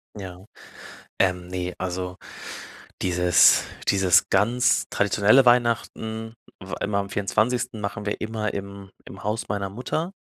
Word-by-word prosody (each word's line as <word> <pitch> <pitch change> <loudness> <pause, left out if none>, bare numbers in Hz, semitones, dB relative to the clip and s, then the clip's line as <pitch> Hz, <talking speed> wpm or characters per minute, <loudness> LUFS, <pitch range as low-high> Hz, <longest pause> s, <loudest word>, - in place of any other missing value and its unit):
Ja. 95 -2 -9 0.7
Ähm, 90 -2 +1
ne, 90 0 -4
also 90 0 -4 0.8
dieses 90 -1 +5 0.3
dieses 95 -3 +4
ganz 120 +6 +2
traditionelle 105 +6 +4
Weihnachten, 115 -2 +1 0.3
w 95 - -8
immer 100 0 0
am 100 0 -4
24. 110 +4 0
machen 100 0 -4
wir 100 - -3
immer 110 -1 -3
im 100 0 -7 0.2
im 95 - -11
Haus 110 +3 -2
meiner 100 -1 -2
Mutter 130 - -3
100 Hz, 125 wpm, -24 LUFS, 95-110 Hz, 0.8 s, dieses